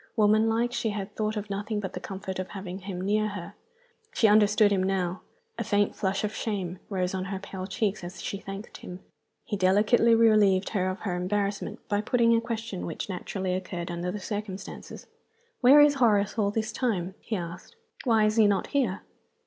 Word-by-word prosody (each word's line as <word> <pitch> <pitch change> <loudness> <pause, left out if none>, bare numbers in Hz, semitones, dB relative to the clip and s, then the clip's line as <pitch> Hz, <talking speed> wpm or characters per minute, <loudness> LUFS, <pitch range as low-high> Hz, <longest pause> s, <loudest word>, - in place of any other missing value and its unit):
Woman 215 +1 +4
like, 235 +2 0
she 230 - -1
had 205 0 -5
thought 215 0 -1
of 210 0 -4
nothing 210 +2 -2
but 190 -3 -5
the - - -4
comfort 190 0 -6
of 185 - -3
having 190 -2 -7
him 190 -1 -6
near 210 +3 +1
her. 205 -1 -7 0.6
She 225 - +5
understood 210 0 +5
him 195 -2 +2
now. 185 -1 -1 0.4
A - - 0
faint 205 -2 +1
flush 195 +1 -1
of 210 0 -2
shame 190 -6 -3
rose 185 -2 -1
on 185 -1 -2
her 195 0 -4
pale 190 -1 -7
cheeks 205 -1 -1
as 180 +2 -8
she 200 - -4
thanked 195 +2 -8
him. 180 +1 -9 0.4
He 215 - -2
delicately 210 +5 +4
relieved 210 -4 +4
her 185 -3 0
from - - -15
her 190 -4 -1
embarrassment 200 +2 -2
by 205 -1 +1
putting 230 +1 +3
a 230 - +2
question 230 -4 -4
which 165 - -5
naturally 185 0 -3
occurred 180 -2 -4
under 175 +1 -3
the 210 - -4
circumstances. 205 -1 -6 0.5
"Where 270 +4 +7
is 295 0 +7
Horace 210 -7 +2
all 210 -3 +1
this 220 +1 -2
time?" 200 -7 -1
he 225 - -3
asked. 175 - -7 0.3
"Why 225 -4 +4
is 215 +1 +1
he 220 -2 +6
not 200 -1 +1
here?" 245 -9 0
205 Hz, 195 wpm, -27 LUFS, 190-220 Hz, 0.6 s, Where